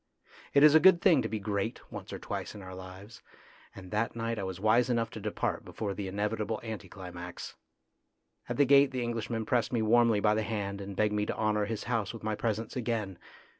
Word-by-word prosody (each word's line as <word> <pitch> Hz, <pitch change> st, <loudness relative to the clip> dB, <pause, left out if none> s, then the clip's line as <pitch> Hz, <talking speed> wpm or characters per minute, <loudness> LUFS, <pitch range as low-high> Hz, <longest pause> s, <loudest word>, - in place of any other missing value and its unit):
It 140 Hz, -, +7 dB
is 150 Hz, -1 st, +8 dB
a 160 Hz, -, +8 dB
good 185 Hz, 0 st, +7 dB
thing 170 Hz, -7 st, +5 dB
to 115 Hz, -, -3 dB
be 110 Hz, -, -2 dB
great 100 Hz, +2 st, -2 dB
once -, -, -8 dB
or -, -, -4 dB
twice -, -, -5 dB
in 100 Hz, -, -9 dB
our 95 Hz, 0 st, -9 dB
lives, 95 Hz, +4 st, -10 dB, 0.5 s
and 95 Hz, -2 st, -11 dB
that 110 Hz, +2 st, -1 dB
night 115 Hz, -1 st, -2 dB
I -, -, -3 dB
was 95 Hz, -1 st, -5 dB
wise 115 Hz, +4 st, +3 dB
enough 115 Hz, -2 st, 0 dB
to 110 Hz, -, -7 dB
depart 105 Hz, 0 st, -2 dB
before 100 Hz, -2 st, -4 dB
the 100 Hz, -1 st, -5 dB
inevitable 105 Hz, +2 st, -2 dB
anti 110 Hz, -5 st, -6 dB
climax. 90 Hz, -2 st, -8 dB, 1.0 s
At -, -, -2 dB
the 145 Hz, -, +5 dB
gate 140 Hz, +1 st, +6 dB
the 130 Hz, -2 st, -3 dB
Englishman 115 Hz, -1 st, -3 dB
pressed 120 Hz, +1 st, +1 dB
me 115 Hz, -3 st, +1 dB
warmly 115 Hz, -1 st, +4 dB
by 105 Hz, +1 st, +3 dB
the 110 Hz, -, +1 dB
hand 100 Hz, -2 st, -3 dB
and 100 Hz, 0 st, -7 dB
begged 105 Hz, +1 st, +1 dB
me 105 Hz, 0 st, 0 dB
to -, -, -3 dB
honour 105 Hz, -1 st, +1 dB
his 110 Hz, 0 st, -4 dB
house 115 Hz, -3 st, -2 dB
with 115 Hz, -, -10 dB
my 110 Hz, 0 st, -1 dB
presence 110 Hz, +1 st, -2 dB
again. 110 Hz, -7 st, -2 dB
110 Hz, 220 wpm, -30 LUFS, 100-115 Hz, 1.0 s, is